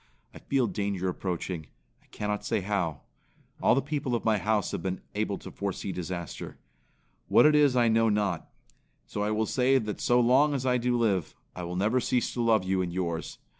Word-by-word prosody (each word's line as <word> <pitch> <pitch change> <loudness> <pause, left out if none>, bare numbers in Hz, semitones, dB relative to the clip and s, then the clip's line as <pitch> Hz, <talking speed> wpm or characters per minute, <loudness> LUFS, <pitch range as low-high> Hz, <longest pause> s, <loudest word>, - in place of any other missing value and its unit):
I - - -11
feel 135 -3 +1
danger 100 -4 -2
approaching; 90 -3 -4 0.3
I - - -30
cannot 105 0 -3
say - - 0
how. 95 -6 -2 0.6
All - - +4
the 135 - +1
people 145 -3 -2
of 115 - -3
my 110 -2 +3
house 105 -1 0
have - - -3
been 95 +1 -3
able 105 -1 -1
to - - -10
foresee 100 -1 -4
disaster. 90 -1 -6 0.7
What - - +6
it 150 - +6
is 145 -3 +4
I 120 -2 +4
know 115 0 +3
not. 100 -5 -1 0.6
So 105 - -5
I 105 - 0
will 110 +1 +1
say 130 +4 +3
that 105 -4 -3
so 120 0 +3
long 135 +5 +4
as 130 -1 -2
I 125 -1 +2
do 120 0 +1
live, 100 -8 0 0.2
I 90 - -5
will 90 +1 -5
never 105 +7 +2
cease 125 -1 0
to 120 - -2
love 110 -4 +3
you 95 0 0
and 90 -1 -2
yours. 85 -2 -3
105 Hz, 205 wpm, -28 LUFS, 95-125 Hz, 0.7 s, What